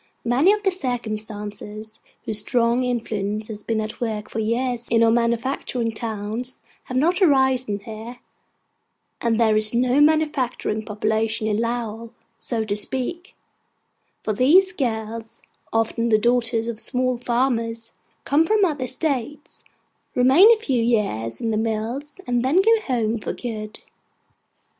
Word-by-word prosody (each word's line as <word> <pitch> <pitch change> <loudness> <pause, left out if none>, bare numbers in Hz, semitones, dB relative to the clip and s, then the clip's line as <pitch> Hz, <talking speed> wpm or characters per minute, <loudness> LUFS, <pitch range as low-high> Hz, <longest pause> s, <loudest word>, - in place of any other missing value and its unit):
Many 260 +11 +4
of 420 0 0
the 385 - +2
circumstances 215 - -5 0.3
whose 215 -1 +2
strong 235 +2 +1
influence 215 -3 -2
has 210 -1 -6
been 225 +1 -2
at 215 +2 -5
work 215 -3 -3
for 225 - -3
years 235 +2 -1
in 230 0 +3
our 225 - +5
manufacturing 235 0 0
towns 220 +2 -5 0.3
have 255 - -3
not 345 +8 +2
arisen 265 - +3
here; 225 +3 -8 1.0
and 230 -1 +1
there 220 -2 +4
is 215 +1 +3
no 250 +3 +3
manufacturing 295 -8 +1
population 220 +1 -1
in 210 -1 0
Lowell, 230 -1 -3 0.3
so 225 -3 -3
to 205 -1 -1
speak: 265 - -2 0.9
for 215 - -1
these 330 - +5
girls 225 -5 -4 0.3
(often 225 +1 0
the 215 - +5
daughters 230 0 +1
of 230 -2 -4
small 255 0 0
farmers) 230 -2 -1 0.3
come 290 +3 +3
from 420 +3 +3
other 290 -7 -2
States, 280 +1 -3 0.5
remain 270 - +7
a 465 - +5
few 265 - 0
years 200 - 0
in 225 - -1
the 215 - 0
mills, 230 - -3
and 245 -1 0
then 265 +5 +1
go 440 +4 +4
home 230 -3 0
for - - -4
good. 215 -3 -6
235 Hz, 140 wpm, -22 LUFS, 220-260 Hz, 1.0 s, remain